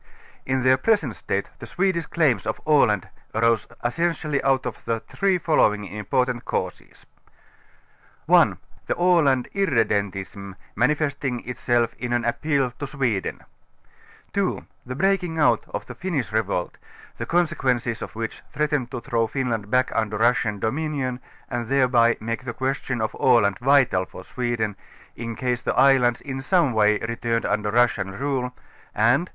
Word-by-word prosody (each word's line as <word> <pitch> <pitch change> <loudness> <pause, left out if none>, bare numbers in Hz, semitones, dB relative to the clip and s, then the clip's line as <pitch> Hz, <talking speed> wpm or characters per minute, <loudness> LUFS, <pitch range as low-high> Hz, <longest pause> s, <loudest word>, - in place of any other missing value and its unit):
Tn 130 -1 0
their 130 0 +5
present 210 +9 +1
State - - -3
the - - -8
Swedish 180 -3 0
claims 130 - +1
of 110 - -2
Aland 125 - +3 0.3
arose 115 -1 +2 0.2
essentially 155 +1 0
out 135 -1 +1
of 125 -4 -5
the 115 -1 0
three 195 -2 0
following 105 - +2
im])f)rtant 120 +5 -1
cau - - -1
ses: - - -23 1.2
1. - - +5 0.3
The - - 0
A├«and 165 -8 +3
irredentism, 100 - -1 0.2
manifesting 140 0 0
itself 120 -1 0
in 120 -1 -2
an 120 -1 0
ap 120 - -1
j)cal 140 -5 0
to 145 - -3
Sweden; 125 - -2 0.9
2. - - -1 0.2
Tire 125 - -4
breaking 180 0 +1
out 150 - +3
of - - -5
the - - -8
Finnish 155 - -3
revolt, 100 -5 -1 0.4
the - - -4
conse 170 -1 +2
quences 120 -4 -1
of - - -7
which 115 0 -5
threatened 145 -4 -1
to 125 -2 -5
throAv 115 -2 0
Finland 120 -6 -2
back 130 +2 +2
under 105 -1 -1
Russian 115 -2 +2
dominion 130 +2 -2 0.3
and 120 -1 -3
thereby 125 -3 +3
make 115 +2 -4
the 120 -2 -5
question 130 -2 -2
of 110 - -1
Aland 100 -5 +4
vital 125 -8 +3
for 95 - -11
Sweden, 120 -4 -2 0.4
in 115 -1 -5
case 125 -1 -1
the - - -1
islands 130 -3 +4
in 135 -1 -5
some 165 -3 +2
wa>' 105 -1 +4
returned 115 0 -1
under 105 0 0
Russian 110 -4 +1
rule; 130 -2 -1 0.4
and 120 +11 +3
3. - - -17
125 Hz, 155 wpm, -24 LUFS, 115-140 Hz, 1.2 s, their